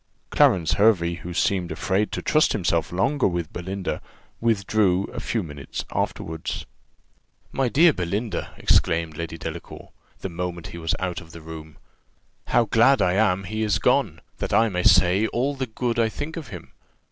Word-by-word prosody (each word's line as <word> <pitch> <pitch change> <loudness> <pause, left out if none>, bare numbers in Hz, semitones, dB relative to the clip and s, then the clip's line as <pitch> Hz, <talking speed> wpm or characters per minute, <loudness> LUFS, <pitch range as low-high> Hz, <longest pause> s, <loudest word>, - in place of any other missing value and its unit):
Clarence 85 -4 +4
Hervey, 90 -6 +4
who 90 - -8
seemed 90 0 0
afraid 100 +2 0
to - - -4
trust 155 0 +3
himself 85 -5 0
longer 135 +10 +1
with 85 -3 -3
Belinda, 95 +2 -4 0.4
withdrew 100 -4 +2
a 120 - -5
few 115 -1 -2
minutes 75 -4 -7
afterward. 80 0 -3 1.0
"My 135 -2 0
dear 160 +5 +5
Belinda," 100 +4 -3
exclaimed 80 -1 +2
Lady 85 +1 -5
Delacour, - - -8 0.3
the - - -3
moment 85 0 -5
that - - -8
he 85 - -8
was 80 0 -1
out 90 -2 -3
of 80 0 -15
the 85 - -10
room, 80 -1 -10 0.7
"how 120 - +3
glad 120 +6 +4
I 90 - +2
am 95 -2 +2
he 110 +4 -4
is 105 -2 +2
gone, - - +1 0.2
that - - -3
I 115 0 +4
may 90 -3 -1
say 95 +4 +4
all 130 +6 -1
the 135 -2 -3
good 120 +1 -2
I 115 -1 +3
think 145 +7 -6
of 165 -4 -6
him! 85 -3 -10
95 Hz, 170 wpm, -24 LUFS, 85-115 Hz, 1.0 s, dear